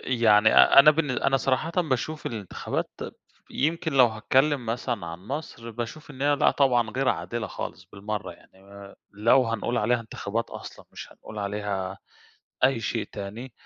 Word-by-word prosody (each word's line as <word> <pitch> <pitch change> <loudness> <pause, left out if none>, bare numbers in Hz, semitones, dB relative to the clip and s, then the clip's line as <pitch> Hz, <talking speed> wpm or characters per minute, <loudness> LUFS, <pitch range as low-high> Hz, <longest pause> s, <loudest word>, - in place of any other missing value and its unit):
يعني 110 -4 +4
أ 65 - +7
أنا 150 +2 +8
بالن 150 -3 0
أنا 135 +2 +1
صراحةً 135 +5 0
باشوف 155 -2 -1
الانتخابات 105 -6 -4 0.6
يمكن 160 +2 -1
لو 130 -3 +6
هاتكلّم 130 +4 +1
مثلًا 115 -5 -3
عن 85 +1 -7
مصر، 125 -5 -6
باشوف 120 +7 -7
إن 135 -1 -8
هي 145 0 +3
لأ - - +4
طبعًا 120 -5 +2
غير 130 +3 0
عادلة 120 -3 -2
خالص - - -7
بالمرّة. 100 -2 -5
يعني 95 - -22
آآ 100 0 -13 0.2
لو 115 +6 +4
هنقول 115 +2 -1
عليها 115 +3 +1
انتخابات 110 0 -4
أصلًا، - - -10
مش - - -10
هنقول 110 - -11
عليها 100 -2 -3 0.7
أي 130 -3 +3
شيء 115 -1 -2
تاني. 110 +5 -7
115 Hz, 160 wpm, -26 LUFS, 105-135 Hz, 0.7 s, أنا